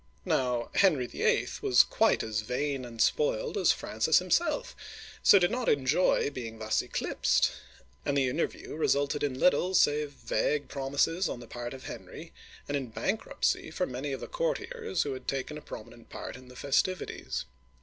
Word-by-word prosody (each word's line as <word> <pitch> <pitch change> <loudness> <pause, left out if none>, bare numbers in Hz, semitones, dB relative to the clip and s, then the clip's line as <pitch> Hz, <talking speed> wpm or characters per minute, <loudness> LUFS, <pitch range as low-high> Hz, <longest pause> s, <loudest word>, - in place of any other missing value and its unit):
Now 125 -2 0
Henry 155 -10 +4
VIII. - - +1
was - - +6
quite - - +2
as 110 -1 -2
vain 130 +3 -2
and 115 -1 -10
spoiled 480 - +1
as 410 - +4
Francis - - +1
himself, - - +1 0.5
so 200 - +8
did 175 0 +3
not 250 0 0
enjoy 145 +2 +2
being 115 -4 -6
thus 110 0 0
eclipsed, - - +1 0.5
and 140 - 0
the 135 -2 +3
inter 125 +7 +1
view - - -10
resulted 145 -2 +1
in 130 -3 -1
little 180 +1 +3
save 150 -2 +3
vague 145 +1 -1
promises 140 +6 0
on - - -4
the 120 - -10
part 120 +2 -6
of 130 - -11
Henry, - - -9 0.3
and 145 - -2
in 135 -3 -2
bankruptcy 195 - -1
for 180 +3 -1
many 130 +3 -4
of 135 - -4
the - - -5
courtiers - - -2
who 140 - -3
had 130 -1 -9
taken 140 +2 -2
a 150 - -7
prominent 115 -1 -11
part - - -7
in 130 0 -13
the 125 - -14
festivities. 145 +8 -1
140 Hz, 170 wpm, -29 LUFS, 125-180 Hz, 0.5 s, so